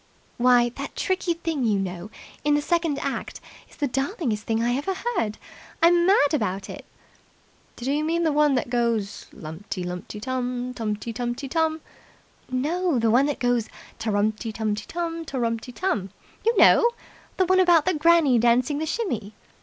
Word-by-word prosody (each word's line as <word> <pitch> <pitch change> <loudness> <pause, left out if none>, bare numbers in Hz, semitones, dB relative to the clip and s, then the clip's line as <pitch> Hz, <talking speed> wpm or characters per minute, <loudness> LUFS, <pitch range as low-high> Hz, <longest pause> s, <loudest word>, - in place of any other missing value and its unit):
"Why, 245 -1 +5
that 280 +1 -6
tricky 375 -2 0
thing 325 -5 -2
you 215 -3 +2
know, 185 0 -4 0.3
in 295 0 +3
the 295 - +1
second 335 -3 0
act 275 - -4 0.3
is - - -18
the 290 - -1
darlingest 270 - -1
thing 225 0 0
I 240 +1 +1
ever 330 +8 -2
heard. 365 - -2 0.4
I'm 345 +1 +5
mad 325 -7 +4
about 195 -8 -1
it." - - -10 0.9
"Do 250 +3 -3
you 295 +2 0
mean 335 +2 0
the 320 - +2
one 295 -1 +3
that 245 -1 -2
goes 230 -4 -1
lumty 170 +4 -7
lumty 180 +4 -6
tum, 250 +1 -3
tumty 225 -1 -3
tumty 245 +3 -3
tum?" 320 +2 0 0.7
"No 305 +5 0
the 225 -1 +2
one 260 +5 +4
that 290 - -2
goes 245 -2 0 0.3
ta 225 0 -2
rumty 215 +2 0
tum 215 -1 -1
tum, 330 +10 -4
ta 280 -4 -6
rumty 230 0 -2
tum. 240 - -2 0.3
You 460 0 +2
know! 470 - +7 0.5
The 375 - +3
one 370 +1 +3
about 345 -4 +5
Granny 320 -6 +5
dancing 245 +5 +2
the 315 - -2
shimmy." 240 - -3
255 Hz, 170 wpm, -24 LUFS, 225-330 Hz, 0.9 s, know